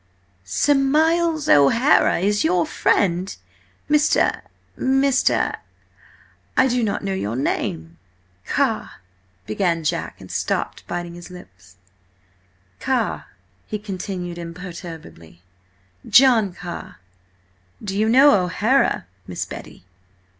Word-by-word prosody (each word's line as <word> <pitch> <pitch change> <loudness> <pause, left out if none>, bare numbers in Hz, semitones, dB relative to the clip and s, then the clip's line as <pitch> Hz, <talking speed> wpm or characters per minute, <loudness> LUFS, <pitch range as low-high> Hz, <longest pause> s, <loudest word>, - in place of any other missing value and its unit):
"Sir 95 - +2
Miles 315 +3 +2
O'Hara! 225 - +4
Is 205 +3 +1
he - - +2
your 175 0 +2
friend, 185 0 0 0.5
Mr.—Mr.—I 275 -3 -1
do 250 -1 0
not 205 -2 -2
know 195 -1 -2
your 115 - -3
name." 80 - -3 0.5
"Car–" - - 0 0.5
began 165 - -1
Jack, 155 - -3
and - - -12
stopped, - - -3
biting 175 0 -5
his 175 +1 -11
lip. 180 - -12 1.3
"Carr," - - -1 0.4
he 215 - -3
continued 185 -3 -6
imperturbably, 165 - -10 0.7
"John 240 -7 +5
Carr. 175 - -8 0.9
Do 195 -2 -4
you 215 +2 +1
know 265 -2 +6
O'Hara, 220 +9 +1 0.2
Miss 90 - -4
Betty?" - - -10
190 Hz, 95 wpm, -21 LUFS, 170-260 Hz, 1.3 s, know